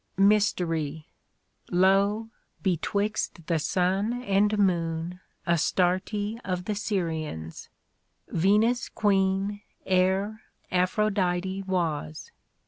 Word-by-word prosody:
Mystery: 170 Hz, -7 st, +2 dB, 0.6 s
lo 195 Hz, +4 st, +3 dB
I -, -, -42 dB, 0.3 s
betwixt 195 Hz, -1 st, -1 dB
the 165 Hz, -1 st, +1 dB
sun 195 Hz, +9 st, 0 dB
and 205 Hz, 0 st, +2 dB
moon 170 Hz, -2 st, 0 dB, 0.3 s
Astarte 185 Hz, +5 st, +1 dB
of 180 Hz, -2 st, -3 dB
the 210 Hz, -, -1 dB
Syrians: 160 Hz, -, -3 dB, 0.6 s
Venus 210 Hz, +8 st, +2 dB
Queen 195 Hz, 0 st, +1 dB, 0.2 s
Ere 190 Hz, +3 st, +1 dB, 0.3 s
Aphrodite 185 Hz, 0 st, +1 dB
was. 160 Hz, -, -2 dB
190 Hz, 80 wpm, -27 LUFS, 175-205 Hz, 0.6 s, lo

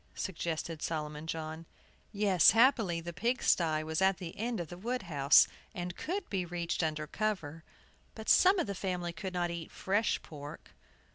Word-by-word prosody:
suggested 165 Hz, -3 st, -4 dB
Solomon 150 Hz, -1 st, -4 dB
John. 160 Hz, 0 st, -5 dB, 0.4 s
Yes, 200 Hz, -5 st, +5 dB
happily, 225 Hz, -7 st, +4 dB
the 170 Hz, +1 st, -6 dB
pigsty 175 Hz, -7 st, +1 dB
was 160 Hz, +2 st, -2 dB
at 190 Hz, -1 st, +4 dB
the 175 Hz, -3 st, -7 dB
end 230 Hz, 0 st, -2 dB
of 170 Hz, -3 st, -5 dB
the 175 Hz, -, -8 dB
wood 245 Hz, +4 st, -2 dB
house, 145 Hz, -5 st, +5 dB, 0.3 s
and 175 Hz, -1 st, -4 dB
could 380 Hz, +5 st, -3 dB
be 190 Hz, -3 st, -1 dB
reached 175 Hz, 0 st, -2 dB
under 155 Hz, -2 st, -1 dB
cover. 165 Hz, -4 st, -3 dB, 0.5 s
But 220 Hz, -1 st, -9 dB
some 380 Hz, +2 st, +6 dB
of -, -, +1 dB
the 200 Hz, -, -3 dB
family 180 Hz, -3 st, -3 dB
could 185 Hz, +2 st, -6 dB
not 175 Hz, -1 st, 0 dB
eat 170 Hz, -1 st, -6 dB
fresh 205 Hz, +3 st, 0 dB
pork. 145 Hz, -1 st, -10 dB
175 Hz, 165 wpm, -32 LUFS, 160-200 Hz, 0.5 s, some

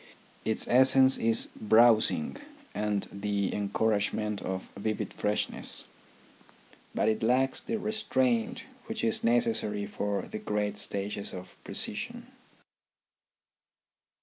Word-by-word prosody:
Its 110 Hz, -, +1 dB
essence 130 Hz, +1 st, +6 dB
is 115 Hz, 0 st, +3 dB
browsing 115 Hz, -, +4 dB, 0.4 s
and 105 Hz, -1 st, -1 dB
the 100 Hz, -1 st, -2 dB
encouragement 105 Hz, 0 st, 0 dB
of 95 Hz, 0 st, -5 dB
vivid 110 Hz, +1 st, -3 dB
freshness. 105 Hz, 0 st, -1 dB, 1.1 s
But -, -, +1 dB
it 110 Hz, 0 st, +1 dB
lacks 130 Hz, +4 st, +2 dB
the 225 Hz, -, -3 dB
restraint 230 Hz, +2 st, 0 dB, 0.2 s
which 225 Hz, 0 st, -4 dB
is 225 Hz, 0 st, 0 dB
necessary 230 Hz, -, +1 dB
for 100 Hz, 0 st, -2 dB
the 110 Hz, -, -6 dB
great 105 Hz, -1 st, -2 dB
stages 100 Hz, 0 st, -3 dB
of 90 Hz, 0 st, -9 dB
precision. -, -, -4 dB
110 Hz, 100 wpm, -29 LUFS, -, 1.1 s, essence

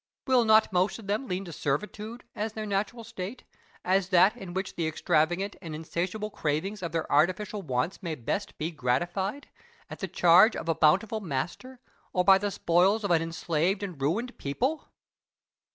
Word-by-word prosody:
Will 255 Hz, -3 st, +4 dB
not 220 Hz, -2 st, +5 dB
most 180 Hz, +2 st, +2 dB
of 225 Hz, -, -12 dB
them 210 Hz, +7 st, -2 dB
lean 185 Hz, 0 st, -3 dB
to 170 Hz, -, -8 dB
servitude, 210 Hz, -, -3 dB
as 215 Hz, +1 st, -3 dB
their 215 Hz, -1 st, -4 dB
natural 205 Hz, +3 st, -2 dB
state, 215 Hz, +1 st, -7 dB, 0.4 s
as 190 Hz, +1 st, +2 dB
that 190 Hz, +4 st, +5 dB
in 190 Hz, -7 st, -9 dB
which 190 Hz, 0 st, -3 dB
the 165 Hz, -2 st, -2 dB
extravagant 175 Hz, +5 st, 0 dB
and 160 Hz, -4 st, -6 dB
insatiable 180 Hz, +7 st, -3 dB
cravings 180 Hz, +8 st, -2 dB
of 170 Hz, -3 st, -4 dB
their 165 Hz, 0 st, -1 dB
artificial 185 Hz, +7 st, +1 dB
wants 130 Hz, +3 st, -2 dB
may 170 Hz, -4 st, -3 dB
best 175 Hz, -, -4 dB
be 160 Hz, +3 st, -3 dB
gratified 175 Hz, -, -1 dB, 0.4 s
at -, -, -7 dB
the -, -, -3 dB
charge 180 Hz, +6 st, +6 dB
of -, -, -5 dB
a 165 Hz, -, +3 dB
bountiful 190 Hz, +8 st, +3 dB
master 190 Hz, -, -4 dB, 0.3 s
or 180 Hz, -, +2 dB
by 195 Hz, 0 st, +7 dB
the 205 Hz, +1 st, -1 dB
spoils 190 Hz, +4 st, +2 dB
of 200 Hz, -, 0 dB
an 165 Hz, -2 st, +4 dB
enslaved 165 Hz, +3 st, -1 dB
and 180 Hz, -8 st, -6 dB
ruined 220 Hz, -, -1 dB
people? 255 Hz, -, -2 dB
190 Hz, 175 wpm, -28 LUFS, 165-210 Hz, 0.4 s, by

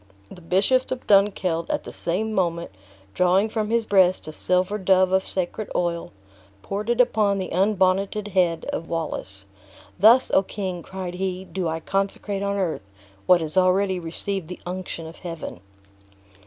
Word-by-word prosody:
The 180 Hz, -, -11 dB
Bishop 200 Hz, +10 st, +2 dB
of 255 Hz, -1 st, -4 dB
Dunkeld 195 Hz, -4 st, +2 dB
at -, -, -1 dB
the -, -, -8 dB
same 215 Hz, +6 st, -2 dB
moment 170 Hz, -, -1 dB, 0.4 s
drawing 185 Hz, +4 st, +3 dB
from 215 Hz, -1 st, -2 dB
his 230 Hz, 0 st, +1 dB
breast 185 Hz, -4 st, +3 dB
a -, -, -5 dB
silver 185 Hz, +5 st, 0 dB
dove 185 Hz, -1 st, +3 dB
of 190 Hz, 0 st, +1 dB
sacred 190 Hz, +3 st, -3 dB
oil, 170 Hz, -1 st, -1 dB, 0.5 s
poured 205 Hz, +3 st, -4 dB
it 240 Hz, 0 st, +1 dB
upon 215 Hz, -5 st, +3 dB
the 190 Hz, -1 st, -4 dB
unbonneted 195 Hz, +2 st, +1 dB
head 175 Hz, -4 st, +1 dB
of 165 Hz, -, -4 dB
Wallace. 100 Hz, -, -4 dB, 0.5 s
"Thus, 230 Hz, +6 st, +6 dB
O -, -, +5 dB
King!" 185 Hz, -3 st, -5 dB
cried 185 Hz, 0 st, -6 dB
he, 185 Hz, 0 st, -3 dB
"do 185 Hz, -2 st, -3 dB
I 160 Hz, 0 st, -2 dB
consecrate 195 Hz, +2 st, -2 dB
on 200 Hz, 0 st, -1 dB
earth, 165 Hz, -, -2 dB, 0.4 s
what 180 Hz, -2 st, +6 dB
has 155 Hz, +1 st, -4 dB
already 185 Hz, 0 st, +3 dB
received 175 Hz, +2 st, -3 dB
the 180 Hz, -, -8 dB
unction 180 Hz, -2 st, -5 dB
of 160 Hz, +1 st, -10 dB
Heaven!" 165 Hz, -, -7 dB
185 Hz, 160 wpm, -24 LUFS, 175-200 Hz, 0.5 s, Thus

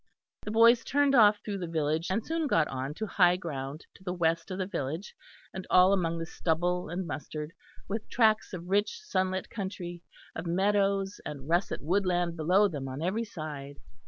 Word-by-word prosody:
The -, -, -6 dB
boys 230 Hz, +2 st, +6 dB
turned 285 Hz, 0 st, +2 dB
off 210 Hz, -4 st, +6 dB
through 200 Hz, -2 st, -3 dB
the 175 Hz, -, -4 dB
village, 160 Hz, 0 st, -1 dB
and 205 Hz, +4 st, -1 dB
soon 325 Hz, -1 st, -1 dB
got 165 Hz, -, +3 dB
on 135 Hz, +2 st, -4 dB
to 220 Hz, -, -3 dB
high 180 Hz, -4 st, +4 dB
ground 145 Hz, -4 st, -6 dB
to 190 Hz, -, -18 dB
the 180 Hz, -1 st, -3 dB
west 165 Hz, -1 st, 0 dB
of 185 Hz, -, -4 dB
the 190 Hz, -, -1 dB
village 160 Hz, +1 st, -4 dB, 0.4 s
and 190 Hz, -1 st, -6 dB
all 185 Hz, +2 st, +6 dB
among 170 Hz, -3 st, 0 dB
the 165 Hz, -, -3 dB
stubble 175 Hz, +2 st, -1 dB
and 180 Hz, +2 st, -3 dB
mustard, 150 Hz, +1 st, -5 dB, 0.4 s
with 215 Hz, +2 st, -4 dB
tracts 220 Hz, -5 st, +3 dB
of 175 Hz, -2 st, -7 dB
rich 205 Hz, -, +1 dB
sunlit 185 Hz, -, -1 dB
country, 185 Hz, -4 st, -5 dB, 0.3 s
of 165 Hz, +2 st, -5 dB
meadows 195 Hz, +2 st, +1 dB
and 140 Hz, -2 st, -7 dB
russet 175 Hz, 0 st, 0 dB
woodland 175 Hz, 0 st, +1 dB
below 180 Hz, +6 st, +4 dB
them 145 Hz, -7 st, -5 dB
on 135 Hz, +4 st, -5 dB
every 210 Hz, +6 st, 0 dB
side. 145 Hz, -7 st, -7 dB
180 Hz, 185 wpm, -29 LUFS, 160-200 Hz, 0.4 s, boys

